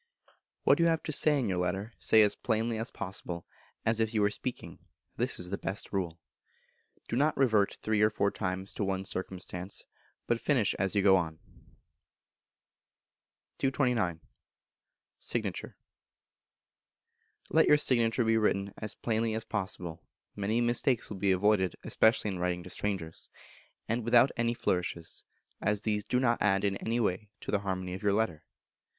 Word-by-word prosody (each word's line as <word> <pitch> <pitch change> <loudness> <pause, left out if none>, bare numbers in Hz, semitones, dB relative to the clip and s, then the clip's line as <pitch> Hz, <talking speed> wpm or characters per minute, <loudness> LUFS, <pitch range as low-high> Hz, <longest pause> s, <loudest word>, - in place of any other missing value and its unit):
What - - +5
you 170 - +5
have 165 -1 +1
to - - -3
say 150 0 +3
in 130 - 0
your 95 -2 0
Letter, 95 +5 -2
say 110 -1 +5
as 105 - +3
plainly 115 0 -1
as 115 - -2
possible, 90 -2 -5 0.4
as 115 0 +2
if 110 0 0
you 105 - +3
were 100 - +3
speaking; 125 +3 -5 0.4
this - - 0
is 90 0 -4
the 100 - -2
best 100 +2 -4
rule. 85 -4 -2 0.9
Do - - -2
not 145 +4 +2
revert 110 -7 +3
three 110 -1 +1
or 105 - +6
four 100 -2 0
times 95 -1 -3
to - - -2
one 95 -1 -1
circumstance, 95 0 -5 0.4
but 120 -1 0
finish 130 -8 +2
as 95 +1 +1
you 100 - +3
go 95 -1 +7
on. 80 -3 -2 2.2
229. 125 - +1 1.0
Signature. - - -3 1.7
Let - - +5
your 150 - +7
signature 120 -4 +2
be 115 0 +3
written 100 -2 +1
as 105 -2 -4
plainly 115 -1 0
as 110 - -3
possible 90 -4 -4 0.3
(many 105 +3 0
mistakes 120 0 +1
will 105 - -5
be 95 +1 +2
avoided, 95 0 +2
especially 110 -2 +3
in 95 - -5
writing 90 0 -1
to 90 - -6
strangers), 95 -6 -2 0.6
and 115 +1 -1
without 120 +3 +5
any 115 0 0
flourishes, 85 -5 -2 0.4
as 105 0 +1
these 105 -2 0
do 125 - +1
not 120 -2 +2
add 95 -1 +3
in 100 -1 +1
any 115 +3 -1
way 105 -1 -1
to - - -5
the 105 - +2
harmony 95 -2 -3
of 95 - -6
your 100 -2 +2
letter. 100 -8 0
105 Hz, 160 wpm, -30 LUFS, 95-115 Hz, 2.2 s, go